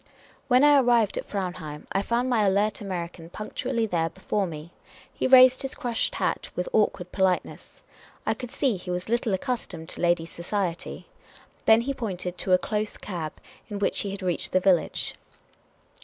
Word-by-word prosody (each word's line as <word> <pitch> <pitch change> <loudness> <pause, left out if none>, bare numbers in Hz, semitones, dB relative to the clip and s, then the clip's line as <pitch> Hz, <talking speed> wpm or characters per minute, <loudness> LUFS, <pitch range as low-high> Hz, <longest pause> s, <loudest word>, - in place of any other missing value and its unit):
When 255 +1 +5
I 290 -1 +7
arrived 235 -5 +3
at - - -7
Fraunheim, 180 -6 -5
I 195 - +1
found 235 +4 0
my 235 -4 +2
alert 205 +3 +1
American 170 -4 -5
punctually 230 +4 -2
there 165 -5 0
before 190 +3 -2
me. 160 0 -8 0.4
He - - 0
raised 255 0 +8
his 270 +1 -4
crushed 240 -5 -1
hat - - -1
with - - -2
awkward - - +1
politeness. 190 -2 -1 0.4
I - - +2
could 245 - -7
see 250 -4 0
he 180 0 -10
was 180 +3 -3
little 235 -1 +1
accustomed 190 -9 -4
to - - -6
ladies' 175 -1 +1
society. 175 -1 -3 0.6
Then 220 +1 +6
he 275 +4 -2
pointed 185 -8 -4
to 185 - -1
a - - +8
close 210 +2 -2
cab 170 -6 -5 0.4
in 205 - -4
which 200 - +1
he 200 - -1
had 195 0 -6
reached 180 -2 -1
the 185 - +5
village. 185 -2 +1
200 Hz, 170 wpm, -26 LUFS, 180-235 Hz, 0.6 s, raised